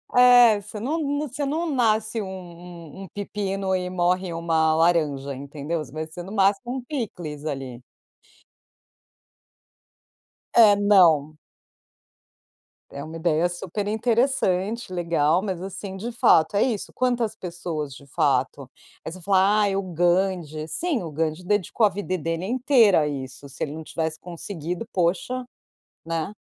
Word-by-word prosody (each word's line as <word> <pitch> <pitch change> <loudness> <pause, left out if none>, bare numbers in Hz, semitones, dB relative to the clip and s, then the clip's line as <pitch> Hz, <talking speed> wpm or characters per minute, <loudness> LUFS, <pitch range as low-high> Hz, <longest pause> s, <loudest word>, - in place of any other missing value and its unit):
É, 245 -4 +7
você 210 +1 -9
não 275 +9 -1
não 290 0 -1
você 285 +2 -4
não 320 +4 -1
nasce 225 -4 +1
um 200 - -5
um 175 -2 -10
um - - -9
pepino 195 -1 -3
e 180 -1 -2
morre 180 0 0
uma 165 -1 +1
laranja, 155 -5 +1
entendeu? 145 +4 -4
Você 135 - -14
vai 155 +2 -5
ser 160 +2 -9
no 190 - -9
máximo 205 +5 +1
um - - -4
picles 185 - -5
ali. 135 -5 -5 2.7
É, 215 -3 +7
não. 170 -8 +4 1.5
É 140 - -7
uma 160 +2 -8
ideia 165 +1 +1
super 180 +3 -4
interessante, 220 -3 0
legal. 170 -1 +1
Mas, 190 -4 -3
assim, 190 0 -6
de 230 +5 -5
fato, 205 -6 +4
é 200 - +4
isso. 230 -6 -2
Quantas 245 -3 0
pessoas 170 -5 -5
de 140 - -13
fato? 135 -2 0 0.4
Aí - - -4
você 185 +2 -10
fala: 195 +3 +3
"Ai, 200 -2 +1
o 195 - 0
Gandhi." 175 -3 0
Sim, 320 - -1
o 165 - -6
Gandhi 155 +3 -2
dedicou 205 +3 +1
a - - +4
vida 190 -2 -3
dele 165 +2 -3
inteira 235 - +4
a 150 - 0
isso, 140 0 -7
se - - -14
ele 145 - -4
não 160 +1 -7
tivesse 160 0 -3
conseguido, 175 +2 -6
poxa, 190 +9 0 0.6
né? 165 +2 -3
180 Hz, 145 wpm, -24 LUFS, 160-210 Hz, 2.7 s, É